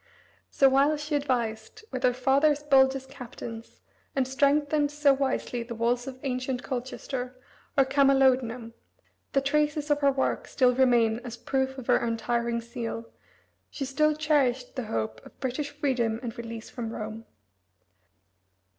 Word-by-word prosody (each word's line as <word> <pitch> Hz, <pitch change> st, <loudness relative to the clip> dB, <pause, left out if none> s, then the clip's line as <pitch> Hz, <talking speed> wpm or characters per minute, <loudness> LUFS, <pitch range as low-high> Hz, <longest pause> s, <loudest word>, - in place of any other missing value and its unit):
So, 275 Hz, -, +4 dB
while 275 Hz, +3 st, +3 dB
she 300 Hz, +1 st, -5 dB
advised 240 Hz, -, -2 dB
with 255 Hz, -, -3 dB
her 250 Hz, -1 st, +3 dB
father's 280 Hz, +3 st, +3 dB
boldest 265 Hz, -2 st, +3 dB
captains 235 Hz, -3 st, -9 dB, 0.3 s
and 265 Hz, -2 st, +1 dB
strengthened 290 Hz, +2 st, +2 dB
so 295 Hz, -1 st, +3 dB
wisely 265 Hz, -3 st, -1 dB
the 235 Hz, 0 st, -6 dB
walls 240 Hz, +2 st, 0 dB
of 260 Hz, -1 st, -7 dB
ancient 255 Hz, -1 st, -2 dB
Colchester, 255 Hz, 0 st, -5 dB, 0.4 s
or 275 Hz, -, +6 dB
Camalodunum, 265 Hz, -4 st, +2 dB, 0.6 s
that 275 Hz, 0 st, +1 dB
traces 300 Hz, +1 st, +1 dB
of 290 Hz, -, +3 dB
her 280 Hz, -1 st, +4 dB
work 265 Hz, 0 st, -1 dB
still 250 Hz, -3 st, +3 dB
remain 240 Hz, -3 st, +3 dB
as 240 Hz, -1 st, -8 dB
proof 265 Hz, +1 st, -1 dB
of 260 Hz, -, -7 dB
her -, -, +4 dB
untiring 235 Hz, 0 st, -1 dB
zeal, 230 Hz, 0 st, -6 dB, 0.6 s
she 275 Hz, -, -4 dB
still 305 Hz, +3 st, +2 dB
cherished 280 Hz, -5 st, +1 dB
the 255 Hz, -4 st, -3 dB
hope 110 Hz, -, -3 dB
of -, -, -16 dB
British 275 Hz, +3 st, -2 dB
freedom 255 Hz, -6 st, -1 dB
and 235 Hz, -1 st, -5 dB
release 230 Hz, -1 st, -7 dB
from 235 Hz, -2 st, -5 dB
Rome. 220 Hz, 0 st, -6 dB
260 Hz, 145 wpm, -27 LUFS, 235-280 Hz, 0.6 s, or